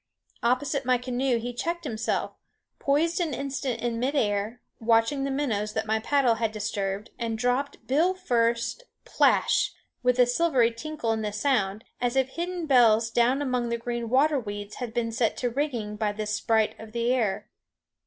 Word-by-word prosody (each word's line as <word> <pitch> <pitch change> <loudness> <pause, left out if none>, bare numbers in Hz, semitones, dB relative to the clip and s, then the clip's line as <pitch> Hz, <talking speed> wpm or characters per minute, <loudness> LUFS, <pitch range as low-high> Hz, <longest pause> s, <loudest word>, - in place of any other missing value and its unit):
Opposite 265 +3 +1
my 255 -1 +3
canoe 250 0 0
he 240 +2 -4
checked 340 +8 -3
himself, 225 -6 -2 0.5
poised 325 +6 +1
an 325 -6 -1
instant 275 -3 -3
in 235 -1 -1
mid 265 +4 0
air, 210 -1 0 0.2
watching 230 +4 +2
the - - -1
minnows 225 -7 -1
that - - -1
my 220 0 +1
paddle 265 +1 +3
had 225 -1 -1
disturbed, 205 -1 -3
and 230 -2 -2
dropped 250 +4 -1
bill 330 +8 +2
first 235 - 0 0.2
plash! - - +3 0.3
with 250 0 +2
a 250 - +6
silvery 245 -2 +2
tinkle 240 0 -3
in 220 0 -1
the 210 -1 -2
sound, 210 -3 0 0.2
as 245 +1 0
if 265 -1 +2
hidden 345 +3 -4
bells 230 -5 +4
down 250 +5 +2
among 250 -3 -1
the 235 - -1
green 235 0 -4
water 280 +4 +3
weeds 205 -2 -6
had 245 -3 -4
been 230 0 -1
set 225 0 0
to 245 -1 -1
ringing 235 -6 -2
by 210 -1 0
this 210 0 -3
sprite 220 0 +2
of 220 -1 -11
the 235 +1 +1
air. 220 -7 -1
240 Hz, 175 wpm, -27 LUFS, 220-270 Hz, 0.5 s, a